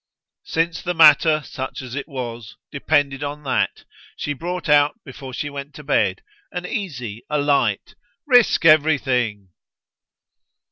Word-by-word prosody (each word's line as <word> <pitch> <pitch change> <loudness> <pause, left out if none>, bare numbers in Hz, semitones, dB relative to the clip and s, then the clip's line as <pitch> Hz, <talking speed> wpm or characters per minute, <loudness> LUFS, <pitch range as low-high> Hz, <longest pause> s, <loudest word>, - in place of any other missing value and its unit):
Since 165 0 -1
the 175 0 -3
matter, 155 -1 +6
such 130 -1 -6
as 125 -2 -9
it 140 +1 -5
was, 120 -6 -7 0.2
depended 140 -1 0
on 145 +1 -5
that, 135 - -1 0.3
she 145 - -3
brought 175 +5 -5
out 145 +6 +3
before 135 -1 -9
she 140 +4 -4
went 140 0 -8
to 150 - -10
bed 145 - 0 0.3
an 180 0 -5
easy, 125 - -5
a 150 - 0
light 145 -1 0 0.3
"Risk 245 - +4
everything!" 130 - +2
145 Hz, 135 wpm, -21 LUFS, 130-160 Hz, 0.3 s, matter